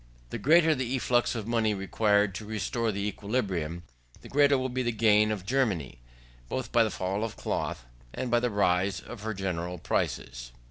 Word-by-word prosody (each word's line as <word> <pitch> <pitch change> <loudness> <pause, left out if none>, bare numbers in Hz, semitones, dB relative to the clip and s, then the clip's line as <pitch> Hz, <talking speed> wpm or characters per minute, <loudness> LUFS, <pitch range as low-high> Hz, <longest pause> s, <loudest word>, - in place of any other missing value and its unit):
The - - -4
greater 160 +2 +5
the 130 -2 -2
efflux 120 -1 +1
of 110 -3 -4
money 115 -3 +1
required 100 +1 +2
to 100 - -6
restore 110 +2 -1
the 100 0 -2
equilibrium, 95 -7 -2 0.4
the - - -12
greater 145 0 +4
will 130 0 -1
be 130 +1 -2
the 120 -1 0
gain 110 -1 +4
of 100 -4 -4
Germany; 95 - 0 0.5
both 130 - -3
by 115 - +5
the 110 - 0
fall 95 +2 -2
of 115 - -4
cloth, 60 - -3 0.3
and 125 - -4
by 120 - +4
the 125 +1 0
rise 95 -2 +1
of 120 -4 -10
her 110 0 -3
general 90 -2 -3
prices. - - -3
105 Hz, 185 wpm, -28 LUFS, 95-120 Hz, 0.5 s, greater